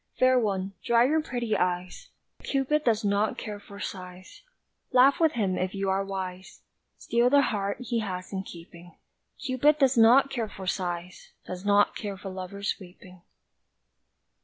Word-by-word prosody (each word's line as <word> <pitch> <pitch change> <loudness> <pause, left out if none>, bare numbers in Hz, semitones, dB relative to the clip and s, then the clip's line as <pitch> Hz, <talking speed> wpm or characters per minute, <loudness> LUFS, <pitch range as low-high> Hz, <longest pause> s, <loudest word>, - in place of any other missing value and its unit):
Fair 255 0 +4
One, 195 -3 -2
dry 235 -1 +4
your 310 +5 +2
pretty 240 -7 -2
eyes, 180 - -2 0.3
Cupid 285 +2 0
does 225 -4 +1
not 205 +2 +1
care 210 -2 -6
for 200 0 -13
sighs, 185 -2 -8 0.5
Laugh 260 +2 +5
with 320 -2 +3
him 195 -5 0
if 185 +2 -2
you 195 -1 -1
are 195 +1 +1
wise, 190 -1 -6 0.3
Steel 235 +1 +2
the 280 +1 +5
heart 200 -4 -1
he 240 -1 -1
has 185 -3 -5
in 190 - -2
keeping; 170 -1 -12 0.4
Cupid 285 +3 +2
does 270 -4 +3
not 255 +5 +6
care 230 -4 -2
for 190 -1 -9
sighs 180 -1 -4
Does 180 0 -7
not 205 0 +3
care 200 -3 -5
for 195 0 -7
lover's 190 +2 -4
weeping! 185 -1 -14
200 Hz, 160 wpm, -27 LUFS, 185-245 Hz, 0.5 s, not